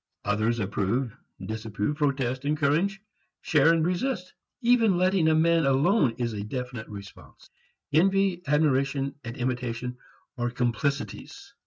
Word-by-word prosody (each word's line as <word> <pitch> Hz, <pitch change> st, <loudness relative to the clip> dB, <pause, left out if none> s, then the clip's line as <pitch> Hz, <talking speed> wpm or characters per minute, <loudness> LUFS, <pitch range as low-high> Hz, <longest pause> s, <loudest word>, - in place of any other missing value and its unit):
Others 110 Hz, +3 st, +1 dB
approve, 110 Hz, +4 st, -1 dB, 0.2 s
disapprove, 110 Hz, +3 st, -3 dB
protest, 135 Hz, -3 st, 0 dB
encourage, 155 Hz, +7 st, +1 dB, 0.4 s
share 155 Hz, +1 st, +4 dB
and 165 Hz, -1 st, +2 dB
resist. 185 Hz, +2 st, -2 dB, 0.3 s
Even 230 Hz, -6 st, +4 dB
letting 185 Hz, -2 st, +3 dB
a 160 Hz, -, +4 dB
man 165 Hz, +1 st, +3 dB
alone 135 Hz, -, +3 dB
is 120 Hz, -2 st, -2 dB
a 100 Hz, -1 st, -4 dB
definite 125 Hz, 0 st, -5 dB
response. 100 Hz, -2 st, -12 dB, 0.4 s
Envy, 190 Hz, +2 st, +3 dB
admiration 140 Hz, -2 st, +1 dB
and 120 Hz, +1 st, -7 dB
imitation 125 Hz, 0 st, -3 dB, 0.4 s
are 120 Hz, 0 st, 0 dB
complicities. 125 Hz, +3 st, -3 dB
135 Hz, 120 wpm, -27 LUFS, 120-165 Hz, 0.4 s, share